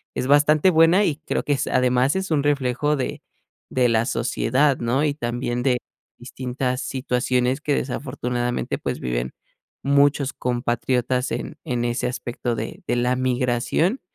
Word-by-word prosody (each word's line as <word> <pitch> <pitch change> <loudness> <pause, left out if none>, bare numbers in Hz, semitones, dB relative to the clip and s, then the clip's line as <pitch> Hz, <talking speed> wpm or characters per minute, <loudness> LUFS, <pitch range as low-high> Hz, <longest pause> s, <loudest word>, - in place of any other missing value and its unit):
es 130 - -2
bastante 150 +4 +5
buena. 165 +3 +5
Y 150 - 0
creo 155 - -3
que 145 - +1
es 140 0 -1
además 125 +3 +2
es 190 -2 -2
un 145 -2 +2
reflejo 145 0 +1
de 130 -3 -3 0.5
de 125 -1 +2
la 115 0 +2
sociedad, 135 +2 +1
¿no? 120 +4 0
Y 150 -2 +1
también 120 -2 -2
de 125 -2 +2 0.4
distintas 125 +1 -3
situaciones 125 0 0
que 150 - 0
desafortunadamente, 125 -2 -2
pues, - - -4
viven 60 0 -2 0.5
muchos 140 0 +3
compatriotas 125 +1 -1
en 155 - -4
en 125 -5 -1
ese 120 +1 -1
aspecto 120 -1 -3
de 110 +1 -6
de - - +1
la 125 +1 +1
migración. 130 - 0
125 Hz, 150 wpm, -23 LUFS, 120-145 Hz, 0.5 s, bastante